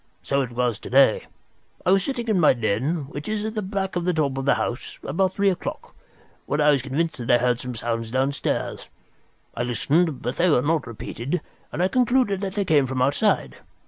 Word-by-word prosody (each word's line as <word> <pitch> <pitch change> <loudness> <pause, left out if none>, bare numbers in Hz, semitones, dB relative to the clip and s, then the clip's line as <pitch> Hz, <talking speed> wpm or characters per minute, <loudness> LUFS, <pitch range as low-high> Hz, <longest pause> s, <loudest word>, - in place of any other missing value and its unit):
So 140 0 +1
it 130 - -3
was 120 -3 0
to - - -9
day. 135 -3 +4 0.6
I 180 - +4
was 195 0 +4
sitting 240 -2 -3
in 210 -4 +2
my 155 - +6
den, 130 +7 -1
which 150 +5 -6
is 215 -1 -2
at 220 - -3
the 215 - -2
back 190 -1 -3
of 175 - -1
the 180 -1 0
top 145 -4 0
of 135 - -4
the 140 - +4
house, 120 - -4
about 185 +6 0
three 200 -1 +3
o'clock, 180 - -6 0.5
when 145 - -1
I 150 0 +5
was 140 -3 +2
convinced 145 +4 -2
that 120 - -5
I 120 - +6
heard 125 0 +1
some 125 -1 -5
sounds 115 0 -3
downstairs. 135 +3 -2 0.6
I - - -4
listened, 145 +5 +1
but 125 +2 -3
they 180 +1 +3
were 125 -5 +3
not 155 -3 0
repeated, 120 +7 -4 0.3
and 175 - -1
I - - +4
concluded 245 -3 +2
that 195 -1 -4
they 200 -2 0
came 145 -6 +3
from 130 0 -3
outside. 145 +11 +1
145 Hz, 215 wpm, -24 LUFS, 125-190 Hz, 0.6 s, my